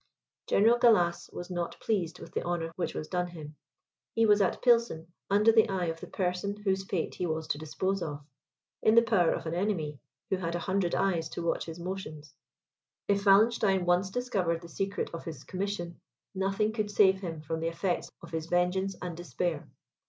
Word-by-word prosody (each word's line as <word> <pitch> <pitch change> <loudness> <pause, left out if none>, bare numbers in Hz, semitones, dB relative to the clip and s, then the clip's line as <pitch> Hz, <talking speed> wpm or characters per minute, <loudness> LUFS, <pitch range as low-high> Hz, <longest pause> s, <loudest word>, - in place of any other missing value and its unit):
General 230 +4 +4
Gallas 180 -8 +3
was 175 +1 -7
not 175 -1 -3
pleased 185 -7 -1
with 165 - -11
the - - -1
honour 170 -2 -2
which 170 -3 -3
was 155 - -4
done 180 -1 -1
him. 155 -3 -10 0.6
He 225 - +4
was 210 -1 +5
at 190 - +1
Pilsen, 230 -9 +2 0.2
under 210 +3 +5
the 225 0 +5
eye 190 -2 0
of 165 0 -3
the - - -8
person 185 +2 -2
whose 190 -1 +1
fate 190 -3 -2
he 180 - -2
was 160 0 -2
to 145 - -1
dispose 185 +5 -2
of; 145 -3 -5 0.6
in 220 - +4
the 235 - +8
power 205 -7 +3
of - - -3
an 160 - -3
enemy, 170 -6 -1 0.3
who 190 - +2
had 170 -2 -3
a 175 - -3
hundred 190 -2 +1
eyes 170 -5 +1
to 170 - -5
watch 170 - 0
his 165 0 -6
motions. 170 -5 -6 0.7
If 200 0 +2
Wallenstein 195 -2 +4
once 180 +2 +2
discovered 190 -7 -1
the 170 - -10
secret 195 +4 -2
of 170 - -6
his 165 -2 -7
commission, 185 -3 -4 0.3
nothing 195 +3 0
could 215 -2 -1
save 190 -2 +4
him 165 -4 -5
from 160 +1 -3
the 165 - -1
effects 175 +2 -1
of - - -10
his 160 -1 -3
vengeance 180 +2 +1
and 175 -2 -4
despair. 175 -2 -3
180 Hz, 195 wpm, -30 LUFS, 165-200 Hz, 0.7 s, the